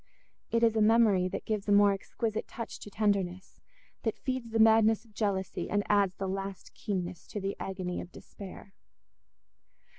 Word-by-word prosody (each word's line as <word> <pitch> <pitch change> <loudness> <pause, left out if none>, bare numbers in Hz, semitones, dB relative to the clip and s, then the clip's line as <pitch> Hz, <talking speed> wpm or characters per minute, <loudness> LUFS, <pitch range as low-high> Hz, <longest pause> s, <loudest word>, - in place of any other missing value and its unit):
It 230 0 +1
is 225 -1 +4
a 220 - +3
memory 210 -4 +5
that - - -5
gives 215 -2 -2
a - - +4
more 205 0 +6
exquisite 215 +2 -3
touch 230 - -7
to - - -9
tenderness, 195 -3 -1 0.4
that 225 - -1
feeds 255 -3 -3
the 225 - -1
madness 220 0 +5
of 220 - -22
jealousy 200 -3 -2
and 205 0 +1
adds 200 -3 +3
the 195 - -3
last 195 0 -5
keenness 180 -4 -4
to 210 - -5
the 195 0 -3
agony 185 -2 -3
of 175 - -10
despair. 195 +1 -11
205 Hz, 170 wpm, -30 LUFS, 190-220 Hz, 0.4 s, more